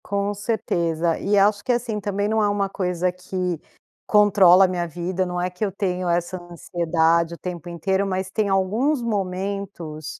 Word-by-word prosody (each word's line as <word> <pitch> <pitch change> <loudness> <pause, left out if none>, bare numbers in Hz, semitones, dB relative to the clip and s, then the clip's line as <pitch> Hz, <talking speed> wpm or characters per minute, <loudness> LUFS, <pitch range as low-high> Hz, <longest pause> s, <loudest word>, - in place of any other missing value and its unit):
Com 200 0 -1
certeza, 170 -6 -1
e 205 +1 +1
acho 205 +1 +3
que, 255 - 0
assim, 235 -3 -1
também, 205 0 -1
não 220 +1 +1
é 205 - +3
uma 200 -1 0
coisa 180 -2 -1
que 180 -1 -3 0.5
controla 195 -3 +6
a - - +2
minha 175 -1 -2
vida, 175 +3 -2
não 180 0 -3
é 180 +1 0
que 180 +3 -6
eu 200 - 0
tenho 185 -2 -2
essa 175 +1 -1
ansiedade 170 0 +1
o - - -16
tempo 175 -1 -6
inteiro, 190 +4 0
mas 190 -1 -3
tem 210 -1 0
alguns 220 +10 +1
momentos, 190 -7 -4
185 Hz, 175 wpm, -23 LUFS, 175-205 Hz, 0.5 s, controla